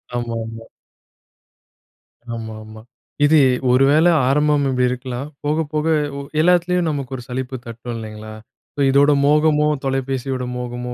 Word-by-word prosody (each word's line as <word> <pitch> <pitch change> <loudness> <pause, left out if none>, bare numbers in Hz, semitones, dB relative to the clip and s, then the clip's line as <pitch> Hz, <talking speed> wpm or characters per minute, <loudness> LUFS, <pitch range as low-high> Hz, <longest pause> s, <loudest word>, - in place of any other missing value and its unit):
ஆமாமா. 115 -1 -5 1.7
ஆமா, 110 -1 -6
ஆமா. 110 0 -12 0.4
இது 155 +1 +5 0.3
ஒரு 130 +2 +4
வேளை 160 +4 +5 0.2
ஆரம்பம் 150 0 +2
இப்படி 125 -1 +1
இருக்கலாம் 125 +2 -5 0.2
போக, 150 +1 0 0.2
போக 155 +1 0 0.3
உ - - -4 0.2
எல்லாத்துலயும் 180 0 +2
நமக்கு 140 -3 -4
ஒரு 125 - -8
சலிப்பு 130 +1 -4
தட்டும் 115 +1 -7
இல்லங்களா, 110 -1 -8 0.4
ஸோ - - -9
இதோட 140 +2 +4
மோகமோ, 150 0 +3 0.2
தொலைபேசியோட 135 -1 -2
மோகமோ 125 0 -5
130 Hz, 125 wpm, -20 LUFS, 120-150 Hz, 1.7 s, இது